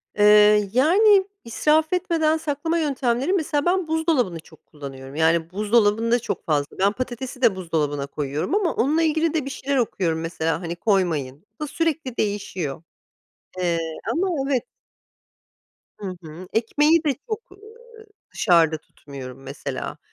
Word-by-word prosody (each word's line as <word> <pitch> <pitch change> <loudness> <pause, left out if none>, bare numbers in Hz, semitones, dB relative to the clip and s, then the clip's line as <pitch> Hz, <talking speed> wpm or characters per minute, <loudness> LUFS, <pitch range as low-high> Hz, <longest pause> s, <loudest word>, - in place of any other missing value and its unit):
Eee, 210 0 +6
yani, 385 - +5 0.2
israf 310 +7 +2
etmeden 330 -3 +1
saklama 320 +2 -2
yöntemleri 275 0 0
mesela 300 -5 0
ben 360 -1 +1
buzdolabını 315 - 0
çok 160 -1 -18
kullanıyorum. 135 -2 -10
Yani, 165 +1 +2
buzdolabında 215 +3 +2
çok - - -5
fazla 145 -2 -1
Ben 195 +1 +4
patatesi 255 +2 -6
de 230 -6 +4
buzdolabına 150 -6 -2
koyuyorum 145 - -2
ama 400 -5 +1
onunla 300 +7 +2
ilgili 320 0 +1
de 310 -5 -1
bir 275 - -4
şeyler 275 0 -2
okuyorum 180 -9 0
mesela. 165 0 -2
Hani, 170 -1 -4
"Koymayın." 170 -7 0
Bu - - -3
da - - -3
sürekli 310 -4 -2
değişiyor. 190 -8 -3 0.8
Eee 175 -2 +1 0.3
Ama, 375 +4 0 0.2
evet. 265 -4 +1 1.4
Hı 190 -3 -6
hı. 165 +4 -10
Ekmeği 295 +8 +3
de 290 -3 +2
çok, 435 -2 -5
ııı, 385 - -16 0.7
dışarıda 165 -4 +3
tutmuyorum 135 -3 -11
mesela. 140 +2 -6
225 Hz, 135 wpm, -23 LUFS, -, 1.4 s, Eee